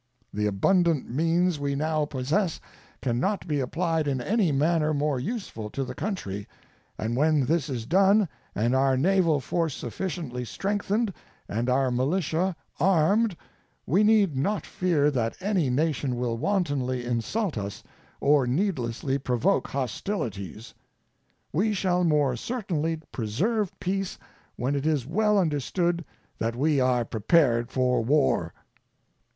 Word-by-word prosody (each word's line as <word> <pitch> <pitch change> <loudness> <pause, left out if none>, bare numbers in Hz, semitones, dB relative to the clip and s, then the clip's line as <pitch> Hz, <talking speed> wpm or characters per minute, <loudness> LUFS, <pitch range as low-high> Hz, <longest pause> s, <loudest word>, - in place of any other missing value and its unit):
The 105 0 0
abundant 165 - +2
means 165 +4 +1
we 140 -1 -1
now 155 +1 0
possess 150 +7 -1 0.4
can 120 -2 0
not 200 +8 -1
be 150 -3 0
applied 160 +3 0
in 135 -2 0
any 195 - +1
manner 155 +2 +2
more 145 -2 0
useful 125 - -5
to 135 - -3
the 130 -1 -5
country, 105 - -4 0.5
and 115 +2 -2
when 150 0 +3
this 155 0 0
is 120 -4 -3
done 195 - +4 0.3
and 115 +4 +1
our 135 0 +3
naval 170 0 +3
force 160 +3 -1
sufficiently 130 -2 -4
strengthened 205 - -1 0.3
and 115 +4 -1
our 130 0 +2
militia 160 +7 0 0.2
armed 190 +4 +3 0.5
we 185 +9 +3
need 210 -7 +4
not 195 +11 -1
fear 155 -5 +1
that 115 -4 -1
any 190 -7 +1
nation 140 -1 0
will 120 -1 -1
wantonly 140 - -1
insult 135 - -1
us 100 -2 -5 0.4
or 140 -2 +3
needlessly 135 - -1
provoke 125 -3 +1
hostilities. 120 - -4 0.8
We 210 +7 +2
shall 180 -2 +1
more 150 -6 +2
certainly 165 - -2
preserve 180 - -1
peace 195 +1 -2 0.4
when 130 +4 -1
it 140 +1 -1
is 150 -6 +1
well 210 +7 +2
understood 170 +1 0 0.4
that 115 +1 -1
we 145 +3 +2
are 125 -2 +2
prepared 120 +1 +2
for 125 -2 +1
War. 130 - +2
150 Hz, 135 wpm, -26 LUFS, 125-180 Hz, 0.8 s, done